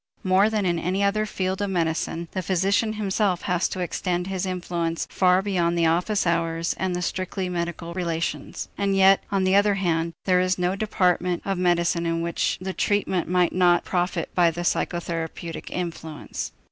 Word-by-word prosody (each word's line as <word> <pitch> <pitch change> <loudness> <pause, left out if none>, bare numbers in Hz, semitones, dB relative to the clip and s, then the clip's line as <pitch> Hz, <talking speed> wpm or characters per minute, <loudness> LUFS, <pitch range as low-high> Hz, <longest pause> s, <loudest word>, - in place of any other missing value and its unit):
More 190 +3 +4
than 215 -3 0
in 170 -2 +1
any 185 +4 0
other 215 +2 +1
field 190 -1 -2
of 205 - -1
medicine, 165 -1 -1
the 185 - -2
physician 195 +5 +1
himself 200 -3 0
has 180 -1 0
to 185 - -4
extend 180 0 -1
his 190 0 -3
influence 175 -2 -2
far 185 0 +3
beyond 175 -4 0
the 170 - +3
office 180 +6 +1
hours 165 0 0
and 185 -1 -1
the 180 - -2
strictly 185 +1 -3
medical 170 -1 -4
relations. 165 -4 -3
And 200 -1 +1
yet, 195 0 +5
on 195 -1 +1
the 185 0 +2
other 200 0 +4
hand, 170 -3 0
there 185 -1 +4
is 185 0 +1
no 180 +1 0
department 180 -4 +1
of 195 -2 -1
medicine 170 -1 +1
in 165 0 0
which 170 -1 0
the 190 +1 -4
treatment 195 -4 0
might 180 -1 +2
not 175 -1 +3
profit 180 -2 -1
by 175 -2 +4
the 170 +1 -5
psychotherapeutic 170 -1 -3
influence. 165 -4 -5
180 Hz, 175 wpm, -24 LUFS, 170-190 Hz, -, yet